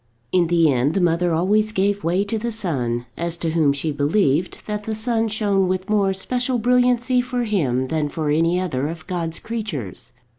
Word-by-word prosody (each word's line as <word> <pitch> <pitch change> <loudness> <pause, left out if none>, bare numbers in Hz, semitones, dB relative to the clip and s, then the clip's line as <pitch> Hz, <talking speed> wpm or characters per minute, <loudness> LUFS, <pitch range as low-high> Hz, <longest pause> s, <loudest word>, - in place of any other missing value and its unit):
In 180 -2 +3
the 165 -3 +3
end 130 +5 +1
the - - +2
mother 175 0 +2
always 205 +6 +2
gave 200 0 0
way 180 +4 +1
to 215 +2 -3
the 235 +2 -3
son; 125 - -2
as 170 0 -2
to 165 -1 -2
whom 155 -3 +3
she 140 +3 0
believed 145 +3 0
that 210 -1 -4
the 220 - -2
sun 225 0 0
shone 205 -3 +1
with 185 +2 -2
more 200 -2 +3
special 245 +6 -1
brilliancy 250 +1 +2
for 245 0 -2
him 140 - 0
than 150 +1 -1
for 150 0 -2
any 165 +4 +2
other 145 -7 -2
of 160 0 -7
God's 170 -3 -3
creatures. 205 - -5
185 Hz, 190 wpm, -21 LUFS, 160-215 Hz, -, In